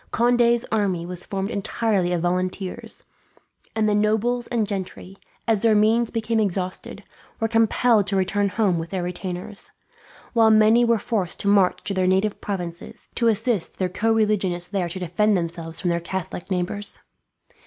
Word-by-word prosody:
Conde's 240 0 +3
army 195 -6 0
was 180 0 -3
formed 195 +2 -3
entirely 200 -3 0
of 175 -1 -1
volunteers, 185 +1 -3 0.7
and 220 -1 +2
the 210 - +2
nobles 220 +3 +1
and 225 -4 0
gentry, 190 -1 -6 0.3
as 225 -3 +3
their 225 -2 +4
means 225 +2 +3
became 225 0 -1
exhausted, 185 -3 -2 0.4
were 225 - +1
compelled 225 -1 +3
to 200 - -1
return 195 +1 +1
home 190 -4 +1
with 165 +1 -5
their 185 -2 -2
retainers; 180 +2 -5 0.6
while 225 -2 +5
many 220 +2 +5
were 235 -1 +3
forced 200 -4 -2
to - - -3
march 200 -2 +3
to 200 - -2
their 185 -1 +1
native 190 +3 +1
provinces, 175 -4 -5
to 235 - +1
assist 225 -3 0
their 185 -1 0
co 225 +5 0
religionists 200 -5 +1
there 185 -4 -1
to 170 - -6
defend 205 +3 +1
themselves 165 -1 -4
from 175 - 0
their 170 - 0
Catholic 175 +1 -5
neighbours. 190 +2 -1
200 Hz, 165 wpm, -23 LUFS, 180-220 Hz, 0.7 s, while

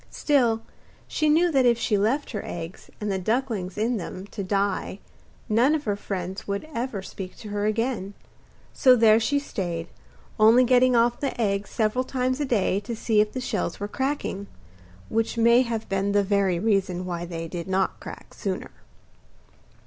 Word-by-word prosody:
Still, 240 -6 +2 0.4
she 310 -1 +1
knew 335 +3 +4
that 270 -3 +3
if 235 -1 +4
she 225 -2 0
left 230 +9 0
her 210 - -4
eggs 170 +1 -7
and 210 -1 -2
the 190 - -1
ducklings 215 -3 -1
in 230 +3 +1
them 185 0 -6
to 200 - -4
die 195 0 -1 0.5
none 240 +8 +3
of 300 - -3
her 205 -6 0
friends 190 -1 -5
would 200 +8 -3
ever 235 -5 -3
speak 190 -1 -8
to 215 - -9
her 205 0 -1
again; 215 -3 -1 0.6
so 255 -2 +6
there 225 -2 +6
she 285 +5 +1
stayed, 175 -11 -4 0.5
only 225 +4 +7
getting 250 0 +4
off 235 +1 +3
the 275 -4 -3
eggs 200 -2 0
several 220 +3 0
times 255 0 -1
a 290 - 0
day 205 -6 +1
to 220 +3 -5
see 220 -1 +2
if 210 0 -1
the 255 - -3
shells 210 -8 -2
were 205 - -3
cracking 265 -5 -3 0.6
which 225 +1 -1
may 235 +2 +5
have 230 -3 -3
been 195 +1 0
the 205 0 +4
very 195 -2 +1
reason 190 -2 0
why 175 -1 -3
they 165 -1 -5
did 170 +1 -6
not 190 0 0
crack - - -10
sooner. - - -4
215 Hz, 180 wpm, -25 LUFS, 195-245 Hz, 0.6 s, only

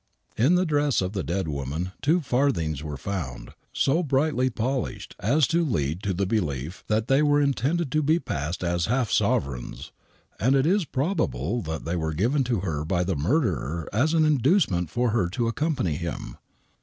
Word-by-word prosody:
In 135 +11 +4
the 180 +1 +2
dress 145 -3 +2
of 95 +1 -2
the 95 - -1
dead 85 +7 -1
w^oman 75 +4 -3
two 165 +5 +3
farthings 120 - 0
were 75 -2 -5
found, 65 -8 -5 0.2
so 155 +6 +2
brightly 140 -3 +1
polished 125 +2 -3
as 140 +9 +3
to 170 +1 +2
lead 80 - -1
to 100 - -1
the 95 +2 0
belief 85 - -2
that 110 +1 0
they 135 +2 +4
were 145 -1 +4
intended 140 +2 0
to 155 - +2
be 155 +3 +3
passed 80 - -3
as 85 -1 0
half 125 -1 0
sovereigns, 65 -3 -1 0.5
and 130 +6 +3
it 135 0 +3
is 190 +2 +2
probable 120 - -1
that 80 -2 -5
they 85 +2 -1
were 80 -2 -2
given 125 - +2
to 120 -6 0
her 80 -6 -2
by 90 +2 0
the 95 0 -1
murderer 85 - 0
as 145 +10 +2
an 160 -1 +4
inducement 140 - +2
for 120 +5 0
her 105 -6 +1
to 115 +5 -1
accompany 125 - -1
him. 85 -2 -5
110 Hz, 180 wpm, -25 LUFS, -, 0.5 s, In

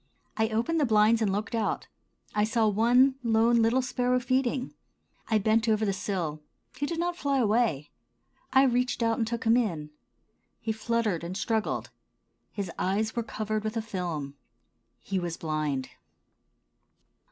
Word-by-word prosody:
I 220 -1 +1
opened 235 +10 0
the 295 - +3
blinds 220 +1 +4
and 210 -3 +2
looked 210 +4 -3
out. 225 -2 -1 0.5
I 210 - +2
saw 220 0 +2
one 245 +6 +4
lone, 230 0 +3
little 235 +3 +3
sparrow 250 0 +1
feeding. 255 +1 0 0.6
I 220 - +4
bent 220 +2 +2
over 215 0 +2
the 200 - +1
sill. 175 -6 -3 0.3
He 285 +3 -2
did 335 - -3
not 350 0 0
fly 280 -4 0
away. 215 - +1 0.6
I 265 - +6
reached 250 -2 +1
out 230 0 +1
and 225 - 0
took 235 0 -3
him 225 +1 +4
in. 165 -11 -1 0.7
He 225 -1 -2
fluttered 220 -5 -1
and 180 +3 -4
struggled. 220 -1 -1 0.6
His 195 -4 -4
eyes 210 +4 0
were 235 - 0
covered 215 -1 -3
with 215 +1 -3
a - - 0
film. 170 -9 -4 0.7
He 195 -1 -1
was 175 -2 -4
blind. 155 -4 -2
220 Hz, 155 wpm, -28 LUFS, 200-240 Hz, 0.7 s, I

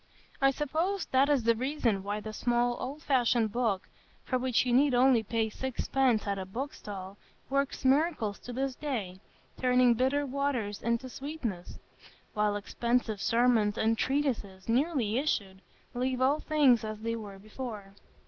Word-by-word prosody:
I 275 - +6
suppose 320 +8 -1
that 265 +2 +4
is 280 -5 +3
the 230 +1 +4
reason 240 -4 0
why 205 +2 -3
the 215 0 -7
small 240 +1 +1
old 285 +4 -6
fashioned 240 -4 +2
book, 225 -5 -1 0.4
for 255 - -1
which 255 -1 +1
you 245 - +1
need 270 +1 +4
only 250 -1 +5
pay 225 +1 -1
sixpence 260 -1 0
at 200 -1 -2
a 190 - -4
book 260 +9 -4
stall, 195 -1 -8 0.3
works 275 0 -1
miracles 265 - +2
to 245 - -9
this 265 +2 -2
day, 225 -11 -4 0.4
turning 250 -1 +4
bitter 265 +4 +1
waters 260 -7 -2
into 235 +2 -1
sweetness; 255 - -6 0.6
while 210 -1 +1
expensive 225 0 -1
sermons 230 -3 +2
and 225 +1 +2
treatises, 230 -9 -1
newly 245 -2 +1
issued, 200 -10 -2 0.3
leave 255 +1 -1
all 275 +4 +3
things 280 -8 +3
as 215 0 -5
they 230 +1 -2
were 205 -3 -8
before. 210 -1 -8
245 Hz, 155 wpm, -30 LUFS, 215-270 Hz, 0.6 s, I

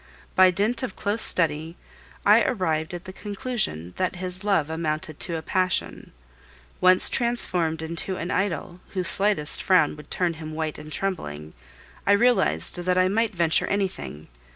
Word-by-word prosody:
By 185 0 +6
dint 205 +6 0
of 255 -7 -4
close 210 +3 -1
study, 160 0 +2 0.5
I - - +6
arrived 160 -6 -1
at 175 - -9
the 185 - -8
conclusion 205 - -3
that 185 0 -1
his 185 +1 -4
love 195 -8 +1
amounted 155 -1 -3
to 170 -2 -1
a 160 - -7
passion. 185 +1 -1 0.7
Once 185 0 +5
transformed 180 -10 -1
into 170 +4 -2
an 175 0 -4
idol, 180 -2 -2 0.2
whose 185 -2 0
slightest 195 -7 +3
frown 180 -6 +3
would 150 - -13
turn 175 -2 0
him 155 0 -7
white 155 -1 -3
and 155 0 -10
trembling, 80 - -4 0.5
I 200 - +6
realized 200 - +2
that 180 +1 0
I 185 0 +3
might 225 +1 0
venture 165 -1 +2
anything. 190 - -3
180 Hz, 155 wpm, -24 LUFS, 160-195 Hz, 0.7 s, By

